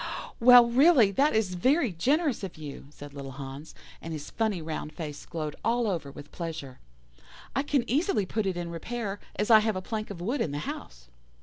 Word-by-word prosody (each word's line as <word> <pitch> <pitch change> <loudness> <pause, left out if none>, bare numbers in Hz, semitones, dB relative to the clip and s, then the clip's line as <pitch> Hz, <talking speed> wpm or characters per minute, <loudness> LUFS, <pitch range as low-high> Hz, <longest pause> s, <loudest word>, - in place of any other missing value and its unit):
"'Well, 245 0 +9
really, 250 - +5
that 275 +4 +2
is 210 -4 +1
generous 265 - +1
of 185 -4 -6
you,' 145 -3 -8
said 145 -1 -11
little 135 -2 -7
Hans, 140 +3 -8 0.3
and 165 - -6
his 150 -1 -7
funny 220 -5 0
round 155 -1 -5
face 150 -2 -7
glowed 155 -3 -4
all 235 +1 +1
over 170 -8 -2
with 145 +1 -12
pleasure. 160 -6 -6 0.8
'I 270 - +2
can 280 -4 0
easily 285 - +1
put 210 +2 -2
it 185 -2 -1
in 170 -1 -4
repair, 205 +3 -4 0.2
as 210 +3 0
I 220 - +9
have 215 -1 0
a - - -1
plank 215 +1 -4
of 200 -4 -7
wood 235 +9 -1
in 150 - -1
the - - -2
house. - - -8
195 Hz, 195 wpm, -28 LUFS, 155-235 Hz, 0.8 s, Well